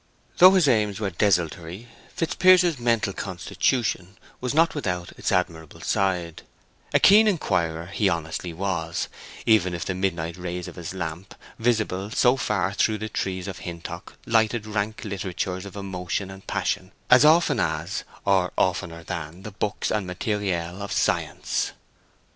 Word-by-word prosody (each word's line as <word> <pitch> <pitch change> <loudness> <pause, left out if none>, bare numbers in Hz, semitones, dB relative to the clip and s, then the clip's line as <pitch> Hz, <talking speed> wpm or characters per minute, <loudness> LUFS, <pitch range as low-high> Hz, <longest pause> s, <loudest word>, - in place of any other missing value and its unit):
Though 185 +2 +9
his 180 -6 +4
aims 105 -5 +2
were 100 -3 -2
desultory, 90 +2 0 0.3
Fitzpiers's 175 -2 +4
mental 115 -4 +1
constitution 95 +1 -1 0.2
was 125 -1 -2
not 165 +1 +4
without 90 - -3
its - - -3
admirable 85 -4 -2
side; 90 -4 -1 0.5
a - - +4
keen 215 +3 +7
inquirer 85 - 0
he 100 +2 +1
honestly 85 0 -3
was, 85 -2 -2 0.4
even 95 -6 +3
if 85 - -4
the 95 - -1
midnight 85 -3 -2
rays 90 0 -5
of - - -9
his 85 +1 -6
lamp, 85 +1 -5 0.2
visible 110 -4 0
so 125 +3 +4
far 100 -7 0
through 110 +2 +1
the 110 +1 -5
trees 95 -2 -3
of 95 - -6
Hintock, 85 -2 -8
lighted 110 -1 +2
rank 105 0 -2
literatures 95 -1 -3
of 100 - -11
emotion 95 -1 -4
and 95 0 -13
passion 95 -1 -2 0.2
as 125 +2 +8
often 160 +3 +5
as, 80 +4 -1 0.2
or 95 -2 +2
oftener 85 -2 0
than, 85 +1 -6
the 105 - -7
books 105 +1 -2
and 100 -4 -1
matériel 90 -2 -2
of 100 - -5
science. - - 0
95 Hz, 150 wpm, -25 LUFS, 85-110 Hz, 0.5 s, Though